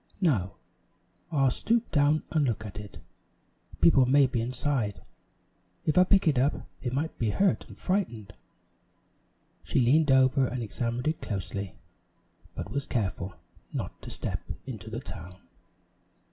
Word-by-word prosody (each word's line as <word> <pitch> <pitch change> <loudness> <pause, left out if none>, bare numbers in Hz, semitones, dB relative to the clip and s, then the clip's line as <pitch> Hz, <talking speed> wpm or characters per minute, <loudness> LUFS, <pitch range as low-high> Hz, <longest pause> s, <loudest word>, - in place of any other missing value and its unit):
No, 110 - +1 0.8
I'll 135 -4 +3
stoop 235 - +1
down 145 +1 +3
and 155 -2 +2
look 110 -2 -2
at 100 0 -7
it. 105 -1 -10 0.8
People 135 -6 +6
may 140 +2 +6
be 125 -3 -1
inside. 125 -3 -1 0.9
If 155 - +2
I 180 - +8
picked 195 -1 +4
it 140 -5 +4
up 140 +4 +1 0.2
they 125 - -1
might 145 +6 -2
be 115 - +1
hurt 195 - +1
and - - -13
frightened." 120 - -2 1.3
She - - +1
leaned 145 +5 +4
over 130 0 +5
and 125 0 -3
examined 120 +4 -2
it 155 +1 0
closely, 100 -1 -4 0.8
but - - -5
was 140 0 -2
careful 95 -4 -2 0.4
not - - -5
to - - -8
step - - -3 0.2
into 110 -4 -7
the 115 +3 -4
town. 90 -6 -9
130 Hz, 145 wpm, -28 LUFS, 110-150 Hz, 1.3 s, I